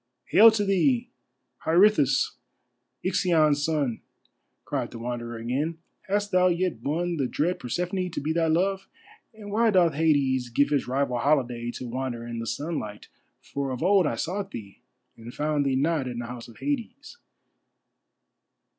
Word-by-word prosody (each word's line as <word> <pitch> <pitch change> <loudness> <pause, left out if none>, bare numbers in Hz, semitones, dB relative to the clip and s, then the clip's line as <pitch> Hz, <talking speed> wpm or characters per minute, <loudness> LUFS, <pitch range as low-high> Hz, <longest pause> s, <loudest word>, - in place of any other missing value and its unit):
"Hail 225 +2 +8
to 210 -2 0
thee, 235 +6 +2 0.5
Pirithous, 170 -3 +3 0.7
Ixion's 160 -6 +2
son," 145 -7 -1 0.6
cried - - -2
the 120 - -9
Wanderer 120 0 -5
again. 135 +8 -2 0.3
"Hast 205 +1 0
thou 185 0 +4
yet 175 -8 0
won 170 +6 -1
the 135 -3 0
dread 170 +8 -1
Persephone 180 +8 -2
to - - -4
be 155 +3 -1
thy 165 0 +1
love? 190 +4 +1 0.4
And 215 -3 -10
why 225 +2 +3
doth 180 -6 +4
Hades 140 -5 +2
give 140 +4 +2
his 145 -4 0
rival 130 -1 0
holiday 120 -4 +1
to 125 - -6
wander 120 -1 -4
in 120 -1 -5
the 115 - -5
sunlight, 115 -5 -4 0.3
for 140 -1 -4
of 130 +3 -4
old 190 -2 +4
I 115 - -1
sought 190 - -3
thee, 100 - -9 0.4
and 115 +1 -9
found 150 -1 0
thee 135 - +1
not 145 0 +1
in 125 -1 -5
the 120 - -4
House 120 0 -8
of 115 - -15
Hades." 285 - -4
150 Hz, 155 wpm, -26 LUFS, 125-185 Hz, 0.7 s, Hail